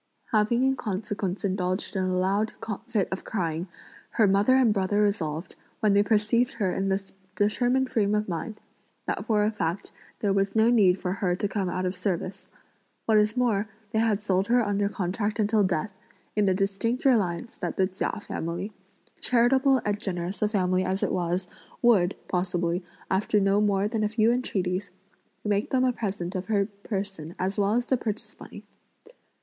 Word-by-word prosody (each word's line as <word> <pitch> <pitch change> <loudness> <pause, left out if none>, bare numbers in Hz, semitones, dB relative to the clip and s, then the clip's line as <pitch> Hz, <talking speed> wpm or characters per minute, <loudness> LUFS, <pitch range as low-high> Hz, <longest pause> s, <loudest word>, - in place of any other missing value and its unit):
Having 220 +3 +3
in 265 0 +3
consequence 200 -3 -3
indulged 185 +1 -1
in 190 -1 +1
a 185 0 0
loud 200 +4 +1 0.3
fit 215 -6 0
of 190 - -4
crying, 170 -3 -2 0.5
her 220 - +4
mother 200 +6 +4
and 250 -5 +4
brother 200 +1 +1
resolved, 175 -6 -1 0.3
when 215 -3 +3
they 200 - +5
perceived 215 +3 +2
her 200 -6 -1
in 195 0 -1
this 195 0 -2 0.2
determined 245 +5 +2
frame 210 -5 +1
of 210 0 0
mind, 190 +5 -4 0.5
that - - -2
for 210 -2 +3
a 210 - +2
fact 175 -3 -3 0.3
there 200 -2 +1
was 195 +1 0
no 220 +2 +5
need 195 -6 +4
for 180 - -2
her 185 -2 0
to 205 - -1
come 195 -2 -2
out 185 +1 -2
of 180 +1 -1
service. 180 0 -3 0.6
What 220 -1 +5
is 210 +3 +1
more 220 -4 +1 0.2
they 220 - +1
had 220 -3 +2
sold 195 -2 0
her 240 -1 +3
under 200 0 +1
contract 205 +3 -2
until 215 -1 +3
death, 185 +2 -1 0.4
in 210 -1 +2
the 190 - +3
distinct 200 +6 -1
reliance 220 -4 +1
that - - -3
the 190 - +4
Chia 190 +2 -3
family, 175 +3 -4 0.5
charitable 260 +2 +3
and 205 0 0
generous 185 -2 -4
a 210 - +2
family 185 -3 +1
as 185 +1 -1
it - - +1
was, 180 +1 -1 0.4
would, 200 -6 +4
possibly, 180 -1 -1 0.3
after 205 +2 +2
no 195 +1 +3
more 200 -1 +2
than 220 0 -1
a 210 - +1
few 220 +1 +3
entreaties, 190 -6 -1 0.6
make 205 0 0
them 255 -1 +2
a 255 -1 +2
present 195 -5 -3
of 185 -1 -4
her 205 -3 +2
person 195 -5 -6
as 190 +3 -2
well 200 +2 +2
as 245 0 +1
the 260 - +1
purchase 220 -2 -4
money. - - -11
200 Hz, 180 wpm, -27 LUFS, 185-220 Hz, 0.6 s, they